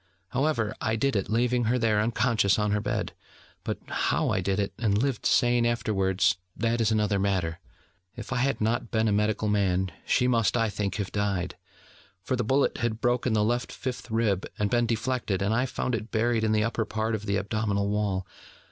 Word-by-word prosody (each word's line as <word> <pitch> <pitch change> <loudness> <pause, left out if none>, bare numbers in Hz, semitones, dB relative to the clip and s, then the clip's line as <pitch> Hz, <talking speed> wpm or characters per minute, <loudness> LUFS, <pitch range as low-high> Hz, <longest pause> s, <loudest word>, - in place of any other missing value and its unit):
However, 125 -5 0
I 110 0 0
did 135 +3 0
it, 100 - -1
leaving 120 +2 +1
her 120 +3 +2
there 110 -3 +2
unconscious 115 -3 +2
on 105 -1 +1
her 105 0 +1
bed: - - -2 0.5
but - - -3
how - - 0
I - - +1
did 95 0 0
it, 100 -1 -1
and 105 -4 +2
lived 130 0 0
sane 120 -1 +3
afterwards, 95 -6 +1 0.2
that 115 0 0
is 110 -1 +2
another 105 -2 +1
matter. 95 -4 0 0.6
If - - -6
I - - 0
had 135 +3 +1
not 115 +1 0
been 110 -1 +1
a - - +2
medical 105 +1 +1
man, 95 -3 +1 0.2
she 125 - +3
must, 115 -1 +2
I 115 -2 +2
think, 100 -2 -2
have 100 -3 -3
died: 100 -3 -1 0.7
for 130 - -1
the 125 - -1
bullet 135 +5 +1
had 115 -1 -1
broken 120 -1 +1
the 105 -1 +3
left 120 +3 0
fifth 125 -1 -5
rib, 110 -4 0
had 105 -1 0
been 120 -1 +2
deflected, 115 -4 -1
and 100 +3 +1
I 125 +3 +1
found 125 0 -3
it 115 0 -3
buried 115 0 +1
in 110 - +2
the 105 0 +2
upper 115 0 0
part 110 +1 -2
of 105 -1 -3
the 100 0 +1
abdominal 100 0 -1
wall. 100 -3 -1
110 Hz, 200 wpm, -27 LUFS, 100-120 Hz, 0.7 s, sane